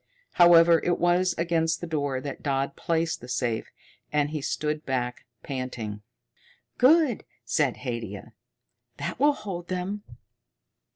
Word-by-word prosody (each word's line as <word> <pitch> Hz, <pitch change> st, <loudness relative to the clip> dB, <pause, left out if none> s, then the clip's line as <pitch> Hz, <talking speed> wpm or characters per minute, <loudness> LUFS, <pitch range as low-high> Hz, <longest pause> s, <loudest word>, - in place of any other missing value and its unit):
However, 170 Hz, -1 st, +7 dB
it 175 Hz, -1 st, +1 dB
was 175 Hz, +1 st, +2 dB
against 165 Hz, -1 st, +1 dB
the -, -, -5 dB
door 145 Hz, -5 st, -1 dB
that 140 Hz, +1 st, -6 dB
Dodd 140 Hz, -1 st, -1 dB
placed 165 Hz, 0 st, -1 dB
the 125 Hz, -, -10 dB
safe, 120 Hz, -2 st, -2 dB, 0.4 s
and 150 Hz, 0 st, +1 dB
he 155 Hz, -2 st, -3 dB
stood 150 Hz, +2 st, -2 dB
back, 125 Hz, -2 st, -3 dB, 0.2 s
panting. 125 Hz, -6 st, -5 dB, 0.8 s
"Good," 280 Hz, -2 st, +5 dB, 0.2 s
said 140 Hz, -6 st, +1 dB
Haidia. 115 Hz, -6 st, -6 dB, 0.6 s
"That -, -, -4 dB
will 290 Hz, +2 st, +5 dB
hold 190 Hz, -8 st, -6 dB
them." 185 Hz, +3 st, -3 dB
160 Hz, 125 wpm, -26 LUFS, 130-175 Hz, 0.8 s, However